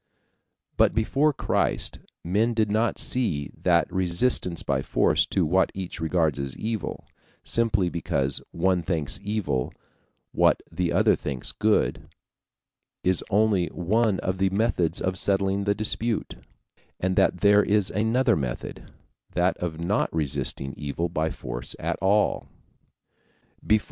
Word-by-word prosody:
But - - +3
before 140 +7 +2
Christ, - - 0 0.2
men 110 +7 +1
did 110 -2 +1
not 110 +2 +1
see 80 - -2
that - - +2
resistance 90 0 +1
by - - 0
force - - +2
to 95 - +1
what 95 +4 +2
each 95 -3 -6
regards 80 -3 +1
as 70 -1 -4
evil, 110 -2 -4 0.4
simply 110 -5 +1
because 70 -5 -1
one 90 +1 +1
thinks 80 -4 -1
evil 100 -11 -2 0.6
what - - +3
the 90 -2 -1
other 85 - +4
thinks 65 -4 -4
good, 110 0 0 0.9
is 95 -1 +1
only 105 -4 +2
one 100 +5 0
of 95 0 -2
the 95 0 +3
methods 95 -5 0
of 95 0 0
settling 100 0 0
the 100 0 +2
dispute, 110 +2 -2 0.7
and 95 0 0
that 90 - +2
there 105 0 +6
is 105 -1 +1
another 110 +5 +2
method, 65 -5 -5 0.4
that 90 +1 +2
of 80 -3 -4
not 90 +5 0
resisting 70 -3 -1
evil 75 +4 -3
by 80 -1 -1
force - - -6
at - - -2
all. 100 +3 +2
95 Hz, 130 wpm, -25 LUFS, 85-105 Hz, 0.9 s, there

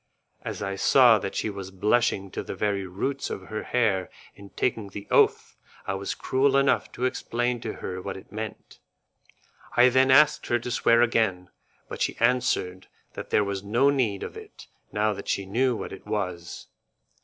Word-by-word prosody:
As - - -5
I 95 0 -3
saw 120 0 +6
that 100 - -5
she 110 - -1
was 100 -1 -7
blushing 100 0 +1
to - - -4
the - - -6
very 100 -2 -1
roots 135 +10 -3
of 95 -1 -7
her 110 0 -3
hair 105 -7 0 0.2
in 100 0 -14
taking 110 -3 -2
the 100 +1 -9
oath, - - +3 0.3
I 95 - -2
was 95 0 -4
cruel 135 +1 +2
enough 140 -1 +2
to 125 - -2
explain 120 -1 -1
to - - -4
her 95 0 -6
what 95 +1 -5
it 95 - -14
meant; 110 +1 -7 1.0
I 125 +1 +7
then 130 +1 +3
asked 150 +3 +5
her 120 - +2
to 120 +1 -6
swear 115 0 +4
again, 105 -6 0 0.4
but - - -8
she - - 0
answered 115 -6 0 0.3
that - - -8
there 105 - +3
was 100 -1 -3
no 120 +8 +2
need 115 -8 0
of - - -7
it - - -12 0.3
now 105 +1 +1
that 100 0 -9
she 100 - -1
knew 120 +6 +1
what - - -6
it 95 - -12
was. 90 -4 -4
105 Hz, 185 wpm, -26 LUFS, 95-125 Hz, 1.0 s, I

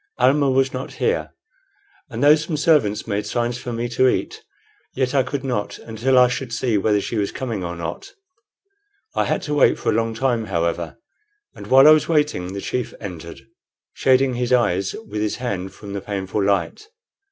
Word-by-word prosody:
Almah 135 +3 +3
was 135 0 +2
not 130 +1 -5
here; 465 +2 -1 0.8
and - - -4
though 145 +1 +8
some 155 +1 -1
servants 145 -10 +2
made 105 -1 -2
signs 120 +2 -1
for 120 - -6
me 120 +1 -2
to 130 +2 +3
eat, - - -2 0.5
yet 130 0 0
I 140 - +4
could 135 +2 -4
not 125 -6 -3
until 115 +4 0
I 125 0 +7
should 125 0 -4
see 115 0 0
whether 105 +1 +2
she 110 +3 -4
was 100 -1 -1
coming 115 -7 -4
or 85 0 -4
not. 85 -1 -6 1.0
I - - +1
had - - -1
to 150 -5 -3
wait 145 - +4
for - - 0
a - - 0
long 115 0 0
time, 120 -2 0
however; 85 -2 -2 0.6
and - - -11
while 135 +2 +7
I - - +10
was 155 +1 +4
waiting 150 - 0
the 100 - -5
chief 125 +3 -3
entered, 85 -5 -8 0.5
shading 130 0 +3
his 125 0 -2
eyes 95 -7 +1
with 105 +1 -4
his 105 - -1
hand 100 -7 -4
from 100 -2 -10
the 100 - -4
painful 100 0 -3
light. 100 - -1
120 Hz, 190 wpm, -21 LUFS, 100-135 Hz, 1.0 s, I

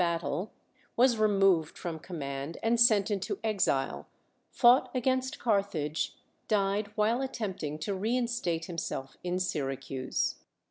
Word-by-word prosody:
battle, 170 +2 -1 0.5
was 245 -1 +5
removed 195 -6 +3
from 165 -2 -5
command 140 -2 -5
and 230 +1 +2
sent 215 -3 +5
into 195 -2 -2
exile; 195 -11 0 0.4
fought 245 +2 +5
against 260 +1 0
Carthage; 195 -9 -1 0.3
died 200 0 +1
while 225 +4 +2
attempting 195 - -3
to 155 +6 -3
reinstate 225 -5 -1
him 170 -2 -4
self 135 -3 -5
in 180 0 -1
Syracuse. 135 -6 -2
195 Hz, 120 wpm, -30 LUFS, 160-225 Hz, 0.5 s, was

